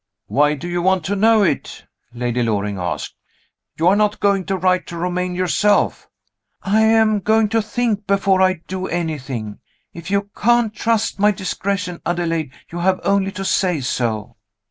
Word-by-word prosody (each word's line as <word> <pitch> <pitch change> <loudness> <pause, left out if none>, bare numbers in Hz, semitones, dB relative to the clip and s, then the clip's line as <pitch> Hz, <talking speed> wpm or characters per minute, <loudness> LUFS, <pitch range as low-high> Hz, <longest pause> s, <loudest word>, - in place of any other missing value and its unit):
"Why 145 +2 +2
do 160 +5 -7
you 175 0 -2
want 190 -2 +1
to 200 - -1
know 220 +1 +4
it?" 160 -7 -2 0.3
Lady 120 0 -2
Loring 105 -3 -1
asked. 90 -1 -4 0.6
"You 165 - +2
are 190 - +5
not 210 0 +1
going 200 -2 +1
to 195 - -1
write 185 0 +1
to 170 - -7
Romayne 180 +1 -2
yourself?" 185 +3 +1 0.5
"I 210 +3 +2
am 220 -1 +4
going 220 +2 +2
to 225 +2 +2
think, 215 -2 -2
before 195 -1 +2
I 185 -3 +2
do 185 0 -4
anything. 135 -11 -4 0.3
If 170 +1 -9
you 200 +1 -1
can't 235 -1 +2
trust 225 -2 0
my 205 +1 +5
discretion, 190 -2 -3
Adelaide, 165 -4 -1 0.2
you 170 - -5
have 185 +1 +1
only 195 -1 +1
to 195 - -5
say 180 -4 +1
so!" 115 -6 -2
185 Hz, 165 wpm, -19 LUFS, 165-205 Hz, 0.6 s, are